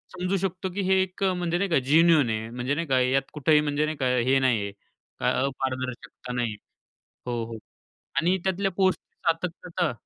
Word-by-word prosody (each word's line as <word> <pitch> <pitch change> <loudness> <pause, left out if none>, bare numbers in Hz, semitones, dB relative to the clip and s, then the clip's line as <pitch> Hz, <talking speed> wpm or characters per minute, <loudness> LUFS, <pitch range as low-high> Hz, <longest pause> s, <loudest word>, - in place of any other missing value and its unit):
समजू 185 +2 0
शकतो 185 0 -2
की 200 - -2
हे 190 0 +5
एक 190 +1 -3
म्हणजे 180 -2 +1
नाही 200 +2 0
का 160 - +3
जेन्युइन 160 -4 +5
आहे 110 0 -2
म्हणजे 125 +4 -2
नाही 165 +1 -2
का, 130 -1 +3
यात 130 +2 +3
कुठेही 150 0 +4
म्हणजे 150 0 0
नाही 155 0 -3
का 130 - 0
हे 130 +3 +3
नाही 125 -5 +2
आहे 100 0 -4 0.5
काय - - +2
अपारदर्शकता 130 -2 -4
नाही. 120 -3 -1 0.7
हो, 120 -2 -1
हो. 115 0 -7 0.6
आणि 180 +3 +2
त्यातल्या 190 +1 0
पोस्टची 190 -1 0
सातत्यता 170 +1 -1
150 Hz, 180 wpm, -26 LUFS, 130-180 Hz, 0.7 s, हे